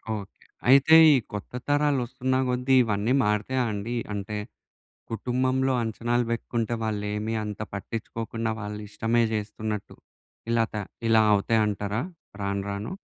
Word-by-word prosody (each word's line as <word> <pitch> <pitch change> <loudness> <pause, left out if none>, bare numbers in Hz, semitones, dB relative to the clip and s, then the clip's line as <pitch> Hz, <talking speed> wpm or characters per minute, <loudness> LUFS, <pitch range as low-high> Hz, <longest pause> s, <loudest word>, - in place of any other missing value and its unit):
Okay. 100 -2 -10 0.2
అయితే 140 +4 +7 0.2
ఈ - - +5 0.2
కొత్త 105 - -6 0.2
తరాలొస్తున్న 130 -3 +1
కొద్దీ 125 +1 +2
ఇవన్నీ 110 +2 0
మారుతాయా 105 +5 +1
అండి. 105 +4 -3 0.2
అంటే 105 +1 -4 0.7
కుటుంబంలో 130 +3 0
అంచనాలు 120 +2 0
బెట్టుకుంటే 115 0 -2
వాళ్ళు 105 -2 -2
ఏమీ 110 +2 -2
అంత 105 0 -5
పట్టించుకోకుండా 115 +2 -4
వాళ్ళు 105 0 -5
ఇష్టమే 115 +3 +1
చేస్తున్నట్టు 105 0 -4 0.6
ఇలా 115 -1 +3
త - - -6 0.3
ఇలా 110 -1 +6
అవుతాయంటారా? 105 +1 0 0.4
రాను 100 0 -1
రాను. 100 - -4
110 Hz, 120 wpm, -26 LUFS, 105-125 Hz, 0.7 s, అయితే